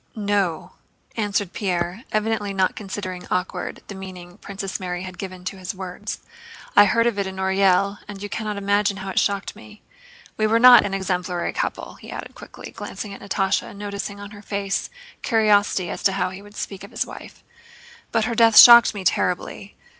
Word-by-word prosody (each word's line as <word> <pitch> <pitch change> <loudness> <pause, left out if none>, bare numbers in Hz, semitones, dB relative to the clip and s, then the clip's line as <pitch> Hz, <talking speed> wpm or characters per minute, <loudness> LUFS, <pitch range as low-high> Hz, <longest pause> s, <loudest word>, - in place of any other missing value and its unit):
"No," 200 -6 -1 0.4
answered 205 -4 -1
Pierre, 180 +2 -2
evidently 215 -2 -1
not 190 -1 +1
considering 190 -3 -6
awkward 180 +1 -3
the - - -8
meaning 185 -1 -10
Princess 195 -1 -5
Mary 180 -1 -4
had 185 -2 -9
given 185 -2 -7
to 190 +1 -5
his 185 +1 -5
words. 190 +3 -6 0.5
"I 205 - +8
heard 230 +3 +2
of 230 -4 0
it 195 - -1
in 190 - -7
Orël 190 +1 +2
and 205 -1 -8
you 205 - -5
cannot 210 0 -4
imagine 200 0 +1
how 190 0 -5
it - - +2
shocked 200 0 -1
me. 210 0 -15 0.5
We 215 - +2
were 225 +1 +3
not 245 -1 +9
an 195 - -3
exemplary 180 -2 -2
couple," - - -4
he - - -11
added - - -7
quickly, - - -11
glancing 205 -2 -7
at - - -11
Natásha 195 -1 -1
and - - -12
noticing 200 0 -5
on 205 0 -9
her 205 -1 -11
face 200 -1 -3 0.3
curiosity 205 -5 +2
as - - -6
to 195 - +2
how 190 -1 -1
he 190 +1 -9
would 205 +1 -15
speak 195 -1 -6
of 200 - -10
his - - -2
wife, - - -12 0.7
"but 225 -1 +1
her 235 - -2
death 225 -1 +5
shocked 235 -2 +10
me 200 - -5
terribly. 185 +2 -1
200 Hz, 190 wpm, -22 LUFS, 190-210 Hz, 0.7 s, shocked